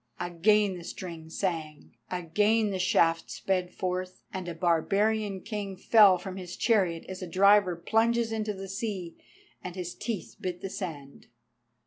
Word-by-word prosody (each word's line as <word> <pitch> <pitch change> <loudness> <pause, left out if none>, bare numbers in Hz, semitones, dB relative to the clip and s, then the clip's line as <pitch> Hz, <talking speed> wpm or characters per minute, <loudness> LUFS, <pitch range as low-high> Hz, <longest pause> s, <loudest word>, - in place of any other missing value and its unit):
Again 190 +2 +2
the - - -10
string 165 -2 -7
sang, 160 -4 -4
again 210 +5 +1
the 190 - -2
shaft 165 -2 +2
sped 180 -2 -1
forth, 185 0 -4
and 185 -2 -4
a 170 - -4
barbarian 195 +4 +1
king 205 -2 -5
fell 200 -1 +6
from 190 +1 -7
his 180 -2 -7
chariot 185 -8 +2
as 185 0 -7
a 185 - -4
diver 195 +1 +5
plunges 225 +6 +1
into 215 -2 -2
the 195 0 -7
sea, 195 -4 -4 0.5
and 180 -1 -6
his 180 -2 -5
teeth 225 -6 -5
bit 180 -1 -4
the 195 - -5
sand. 145 -9 -7
185 Hz, 150 wpm, -28 LUFS, 175-210 Hz, 0.5 s, fell